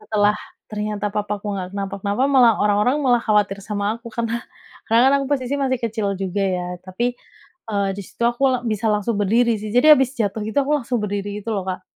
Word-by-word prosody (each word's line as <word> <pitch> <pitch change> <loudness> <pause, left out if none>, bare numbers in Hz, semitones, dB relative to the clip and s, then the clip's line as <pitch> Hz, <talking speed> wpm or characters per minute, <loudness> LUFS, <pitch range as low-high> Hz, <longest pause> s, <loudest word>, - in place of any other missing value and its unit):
setelah 210 -1 +1 0.3
ternyata 210 -1 -3
papaku 210 0 -3
enggak 185 +1 -6
kenapa-kenapa, 200 +3 -2
malah 245 -5 +6
orang-orang 210 +6 +2
malah 245 -3 +4
khawatir 205 -2 +1
sama 210 +2 -2
aku. 235 - -17
Karena 235 0 -1 0.5
karena 230 +1 +4
kan, - - +3
aku - - -4
posisi 260 +1 -3
masih 260 -2 0
kecil 220 -3 -1
juga, 195 +1 -2
ya. 180 -1 -1 0.2
Tapi, 240 +7 -2 0.6
eee, 200 -2 0
di 200 - -5
situ - - -8
aku 240 +3 -1
la 255 - +1
bisa 220 -1 -2
langsung 210 +1 -1
berdiri, 230 +3 +2
sih. 215 - -5
Jadi 250 +5 +4
habis 265 -2 +3
jatuh 215 -3 -1
gitu, 220 - -1
aku 295 - -1
langsung 245 -1 -2
berdiri 205 0 -3
gitu, 230 - -4
lo, 190 -2 -3
Kak. 185 0 -4
210 Hz, 200 wpm, -21 LUFS, 200-240 Hz, 0.6 s, malah